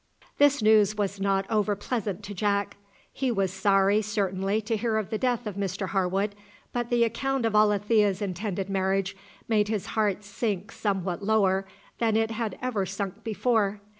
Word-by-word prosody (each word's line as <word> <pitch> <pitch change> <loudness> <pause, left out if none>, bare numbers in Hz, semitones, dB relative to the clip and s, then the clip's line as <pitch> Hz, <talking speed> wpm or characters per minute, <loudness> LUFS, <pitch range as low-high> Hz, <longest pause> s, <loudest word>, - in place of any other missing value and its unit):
This 285 -4 +4
news 215 -1 +5
was 200 -1 -1
not 195 0 +1
over 210 -2 +1
pleasant 205 -2 -3
to 205 0 -6
Jack. 200 +1 0 0.4
He 265 -1 -1
was 195 -5 0
sorry, 195 +1 +3
certainly, 200 -1 -1
to 220 +1 -1
hear 220 0 0
of 215 0 -3
the 220 - -1
death 245 -2 0
of 210 - -3
Mr 195 0 -3
Harwood, 195 +3 0 0.4
but 240 -1 -2
the 240 -1 +3
account 255 +2 0
of 225 - 0
Alethea's 210 -1 +3
intended 195 -1 -3
marriage 195 0 0 0.3
made 210 -2 +2
his 210 -3 -2
heart 210 -2 +1
sink 205 0 -3
somewhat 195 -3 -2
lower 195 -2 +2 0.3
than 225 -2 +2
it 225 0 +1
had 225 -1 -3
ever 235 -6 0
sunk 195 +2 -5
before. 215 -2 +1
205 Hz, 165 wpm, -27 LUFS, 195-220 Hz, 0.4 s, news